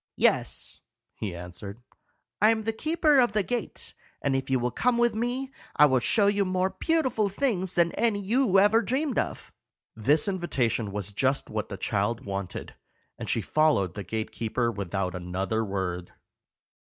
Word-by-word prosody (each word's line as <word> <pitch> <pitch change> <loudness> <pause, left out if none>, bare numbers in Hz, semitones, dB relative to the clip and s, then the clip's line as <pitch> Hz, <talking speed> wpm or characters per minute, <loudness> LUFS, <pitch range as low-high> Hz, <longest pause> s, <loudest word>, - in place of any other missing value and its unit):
"Yes," - - +1 0.3
he 100 -5 -5
answered; 90 +5 -8 0.6
"I 215 - +7
am 225 -1 +1
the 225 +1 -1
keeper 310 +2 +3
of 240 -4 +3
the 210 -1 +2
gate, 245 +4 -4 0.3
and 140 -1 0
if 135 0 -2
you 135 - +3
will 125 0 -1
come 245 - +1
with 240 -1 +3
me, 245 +4 -2 0.2
I 150 - +7
will 130 -3 +3
show 205 - +3
you 200 0 +3
more 185 0 0
beautiful 255 - +1
things 190 -5 -1
than 170 -1 +3
any 225 -3 +1
you 210 0 +2
ever 205 +4 +5
dreamed 265 +2 0
of." - - -4 0.4
This 140 - +2
invitation 125 - -1
was 100 0 -5
just 130 +5 0
what 110 -1 -3
the 100 - -5
child 105 +3 -1
wanted, 100 -2 -5 0.5
and - - -5
she - - +1
followed 150 - +2
the 100 - -5
gate 110 +3 -4
keeper 115 +1 -1
without 95 -3 -3
another 95 +5 -2
word. 95 -3 -3
150 Hz, 165 wpm, -27 LUFS, -, 0.6 s, I